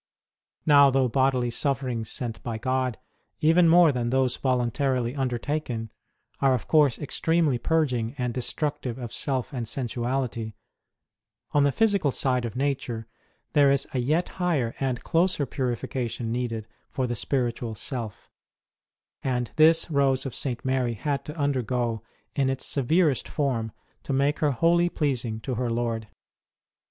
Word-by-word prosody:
Now, 145 -2 +7
though 135 -1 +2
bodily 130 -1 +1
sufferings 125 -4 -1
sent 120 -3 -4
by 115 -2 -4
God, 130 0 -1 0.4
even 165 +2 +5
more 170 -1 +7
than 120 -3 -1
those 130 -1 +2
voluntarily 125 0 0
undertaken, 125 -3 -2 0.5
are 135 -2 +4
of 125 - -5
course 150 -6 +4
extremely 155 -2 +1
purging 130 -6 0
and 125 -2 -2
destructive 135 0 -2
of 120 -3 -6
self 130 -1 -2
and 120 -3 -3
sensuality, 120 -3 -2 1.0
on 145 -2 +4
the 140 - +3
physical 200 -5 +2
side 125 -2 0
of 115 - -5
nature, 130 -4 -2 0.5
there 145 -2 +5
is 140 0 +2
a 130 - 0
yet 155 +8 +1
higher 145 -10 +1
and 130 -3 -2
closer 170 -3 +1
purification 120 -2 -3
needed 115 -2 -3 0.2
for 130 - -1
the 120 - -2
spiritual 120 -2 -2
self; 115 -4 -5 0.9
and 125 -3 -1
this 160 +1 +4
Rose 135 -2 +2
of 135 - -4
St. 125 0 -1
Mary 130 -3 0
had 140 +5 -2
to 150 +2 -7
undergo 125 -5 -1 0.3
in 135 -2 +2
its 135 -1 -2
severest 145 0 +1
form 120 -7 -1 0.3
to - - -4
make 140 +2 +1
her 150 - +2
wholly 170 +6 +3
pleasing 125 -9 -1
to 130 - -3
her 125 0 -1
Lord. 115 -1 -2
130 Hz, 145 wpm, -26 LUFS, 120-145 Hz, 1.0 s, Now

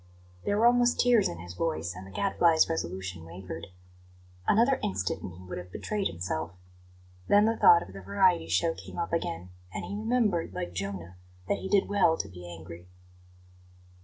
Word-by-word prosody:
There 205 - +1
were 225 - +4
almost 245 0 +4
tears 240 -4 +4
in 85 - -6
his 85 +1 -9
voice, 85 -1 -2
and 90 +2 -9
the - - -12
Gadfly's 170 - +3
resolution 95 - -4
wavered. 85 0 -8 0.8
Another 240 +6 +4
instant 95 0 -2
and 90 - -6
he 90 +2 -12
would 90 0 -6
have 90 0 -10
betrayed 205 - -2
himself. 85 -1 -4 0.7
Then 205 +1 +5
the 225 +1 +2
thought 170 -5 +7
of 95 - -12
the 100 - -8
variety 100 - +2
show 100 - +2
came - - -11
up 170 -1 -3
again, 90 - -2 0.2
and - - -5
he - - -6
remembered, 215 -5 0
like 90 - -4
Jonah, 95 -1 -5 0.3
that - - 0
he 190 - -5
did 200 -2 +3
well 195 -5 +3
to 100 - -3
be 90 -2 -10
angry. 85 +1 -10
95 Hz, 180 wpm, -29 LUFS, -, 0.8 s, thought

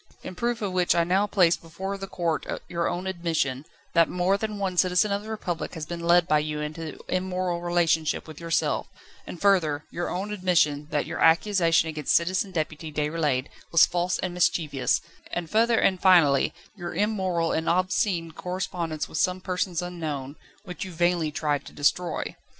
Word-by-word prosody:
In - - -6
proof 235 +4 -2
of 200 - -1
which 180 -1 +2
I 170 - +4
now 190 +4 +2
place 175 -5 +4
before 190 +4 -6
the 195 0 -6
court 170 -4 -2 0.2
your 170 -1 -1
own 175 +1 -3
admission, 165 -7 -1 0.3
that 165 -1 +4
more 180 +2 +1
than 215 +1 -3
one 195 -2 -2
citizen 180 +3 +3
of 200 0 0
the 215 - -10
Republic 180 -6 -4
has 160 -2 -5
been 170 +2 -5
led 170 0 +4
by 150 - +4
you 150 0 -3
into 155 +1 -5
immoral 185 -1 -1
relationship 170 -3 +1
with 155 -2 -10
yourself; 165 -1 0 0.4
and 175 - -7
further, 160 -7 +2
your 175 - -3
own 200 +4 -3
admission, 165 -7 +1
that 145 - 0
your - - -5
accusation 165 -1 +4
against 155 -3 0
Citizen 185 +3 +1
Deputy 155 -2 -4
Déroulède 150 -3 0 0.3
was 170 - +7
false 175 0 -1
and 180 -1 -3
mischievous; 155 -6 +1 0.3
and 175 -2 -4
further, 230 +1 +3
and 185 -4 +2
finally, 165 -8 +5 0.2
your 175 -3 -6
immoral 190 -6 0
and 160 - 0
obscene 180 -1 +1
correspondence 170 -3 -4
with - - -4
some 185 -1 +1
persons 180 -1 -2
unknown, 155 -6 -5 0.3
which 180 -3 -6
you 190 - -7
vainly 175 -2 +1
tried 145 -1 -1
to - - -11
destroy. 170 +5 0
175 Hz, 175 wpm, -26 LUFS, 160-185 Hz, 0.4 s, was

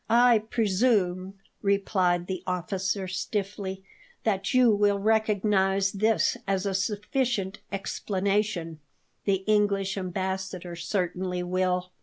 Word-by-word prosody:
"I 240 0 +6
presume," 200 -4 +1 0.3
replied 190 -3 +1
the 185 -1 -4
officer 190 +2 -2
stiffly, 195 0 -3 0.4
"that 200 -3 0
you 255 -3 +5
will 205 -1 +3
recognize 200 -2 +2
this 215 +2 +2
as 195 0 0
a 200 - 0
sufficient 205 +1 -1
explanation; 195 -3 -1 0.5
the 195 -1 +1
English 200 -2 +1
Ambassador 185 -1 -4
certainly 180 +1 -2
will." 180 0 0
195 Hz, 100 wpm, -27 LUFS, 185-210 Hz, 0.5 s, I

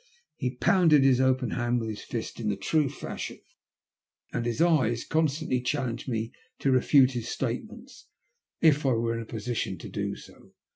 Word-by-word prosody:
He 125 0 -3
pounded 150 +3 +4
his 130 -1 +4
open 130 -2 +2
hand 120 0 0
with 115 - -4
his 105 - -6
fist 115 0 -5
in 110 -2 -1
the 100 - 0
true 145 +8 +1
fashion, 135 - -6 0.9
and 120 - -1
his 115 - -2
eyes 140 -9 +3
constantly 155 -4 0
challenged 125 -1 -2
me 115 -1 -2 0.3
to 135 - +1
refute 130 +1 +5
his 120 -3 -4
statements - - -5 0.5
if 150 -2 +4
I 135 -2 +3
were 115 0 0
in 115 - -3
a - - -7
position 110 -4 -3
to - - -9
do - - -3
so. - - -16
125 Hz, 175 wpm, -27 LUFS, 115-140 Hz, 0.9 s, refute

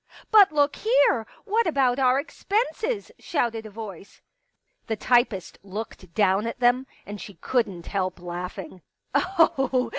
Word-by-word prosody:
" - - -21
But 410 -5 +7
look 290 -1 +2
here! 285 - +3 0.2
What 450 +2 +1
about 270 -4 +2
our 260 0 +4
expenses? 440 - -2
" - - -43
shouted 230 -7 -2
a - - -10
voice. 205 -3 -9 0.7
The 225 - -1
typist 235 -4 +1
looked 195 -3 -8
down 200 +1 +2
at 230 - -5
them, 250 +2 +3 0.2
and 205 0 -7
she 200 - -9
couldn't 200 -4 -1
help 185 -2 -2
laughing. 180 +1 -7
230 Hz, 140 wpm, -25 LUFS, 195-285 Hz, 0.7 s, But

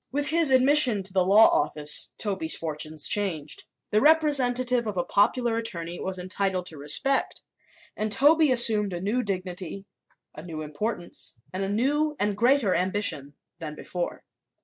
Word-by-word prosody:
With 290 +2 -2
his 325 -1 +3
admission 260 -5 +4
to 185 0 -8
the 185 -1 +2
law 205 +4 +6
office 150 0 0
Toby's 190 -6 0
fortunes 155 -1 -1
changed. 165 -8 -2 0.3
The 215 0 +2
representative 255 -6 +2
of 205 -3 -5
a 175 - 0
popular 230 +4 +1
attorney 175 -6 -5
was 190 0 -4
entitled 185 0 -3
to 165 -4 -9
respect 150 - 0 0.5
and 215 0 -3
Toby 295 +4 +4
assumed 215 -5 +4
a 175 - -4
new 210 +7 -1
dignity, 185 -2 -6 0.5
a 150 - -10
new 160 -2 -7
importance 175 - -6
and 185 - -4
a 195 - -3
new 295 +8 0
and 205 0 -1
greater 240 -2 +2
ambition 180 -6 -2 0.2
than 155 -2 -7
before. 175 +3 -6
205 Hz, 150 wpm, -25 LUFS, 175-250 Hz, 0.5 s, law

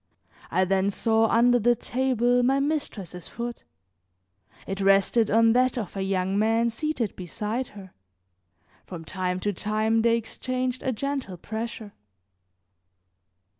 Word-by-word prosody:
I 185 +2 +2
then 190 +1 +1
saw 225 +2 +2
under 245 +2 +4
the 240 +2 +3
table 245 0 +1
my 265 +3 +2
mistress's 255 - -3
foot; 235 +1 -6 1.0
it 195 +1 -4
rested 195 +3 +3
on 225 +1 +5
that 255 +1 +2
of 210 -5 -4
a 195 - -2
young 190 0 0
man 225 +2 +2
seated 250 -4 -2
beside 210 +7 -4
her; 190 -2 -11 0.9
from 165 -3 -8
time 185 +1 -2
to 205 +1 -1
time 215 +3 +1
they 230 0 +3
exchanged 255 +2 -3
a 260 - -1
gentle 265 -6 -3
pressure. 220 +1 -6
225 Hz, 130 wpm, -26 LUFS, 195-245 Hz, 1.0 s, on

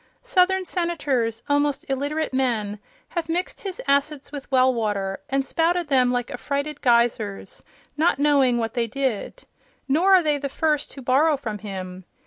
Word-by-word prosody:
Southern 375 0 +2
Senators, 280 - -1
almost 290 -1 +1
illiterate 285 +3 -2
men, 225 -6 0 0.3
have 335 -2 -3
mixed 355 +3 -2
his 390 +2 -6
acids 280 0 0
with 285 -2 -8
well 260 0 +4
water 205 -4 -2
and 270 0 0
spouted 335 +2 0
them 255 -3 +4
like 245 -1 -1
affrighted 285 +1 -3
geysers, 235 -5 +1 0.3
not 315 -1 +2
knowing 280 -4 +3
what 225 -1 -2
they 235 -1 0
did. 265 - -3 0.4
Nor 350 +8 +5
are 365 - +4
they 300 -2 +1
the 280 0 -3
first 300 +1 0
to 270 - -10
borrow 285 +5 +3
from 220 -6 -5
him. 185 -3 -7
275 Hz, 155 wpm, -23 LUFS, 235-305 Hz, 0.4 s, Nor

